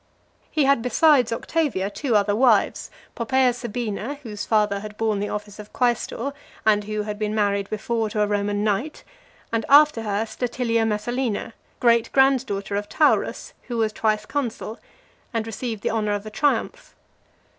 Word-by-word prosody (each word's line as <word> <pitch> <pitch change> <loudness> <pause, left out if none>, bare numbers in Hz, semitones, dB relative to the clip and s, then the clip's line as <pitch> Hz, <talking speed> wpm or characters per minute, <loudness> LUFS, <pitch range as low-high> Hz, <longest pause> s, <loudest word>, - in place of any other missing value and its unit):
XXXV. - - -39
He 305 - +1
had, 275 -3 +3
besides 250 +1 +4
Octavia, 230 -6 -1
two 245 +1 -1
other 205 0 +3
wives: 230 -2 +2 0.3
Poppaea 255 +1 +2
Sabina, 240 +1 -4
whose 210 -4 -6
father 210 -2 +2
had 210 0 -9
borne 220 -2 0
the 205 - -2
office 210 0 -6
of 210 0 -10
quaestor, 245 +2 -1 0.3
and 210 -1 +3
who 215 0 -2
had 210 0 -5
been 215 0 -1
married 200 -2 0
before 220 +1 -1
to 210 0 -1
a - - +3
Roman 205 0 -1
knight: 215 +9 -1 0.5
and, 225 -1 +1
after 295 -4 +6
her, 210 0 -1
Statilia 230 0 -1
Messalina, 230 +1 -2 0.3
great 235 -2 +3
grand 270 -1 +4
daughter 200 -1 -3
of 205 0 -3
Taurus 305 - +1
who 240 - -3
was 220 -1 +1
twice 215 -1 0
consul, 235 -5 -4 0.6
and 225 -1 0
received 225 -1 -5
the - - 0
honour 215 -2 0
of 205 0 -3
a 215 - -7
triumph. 295 - -1
220 Hz, 165 wpm, -23 LUFS, 210-245 Hz, 0.6 s, after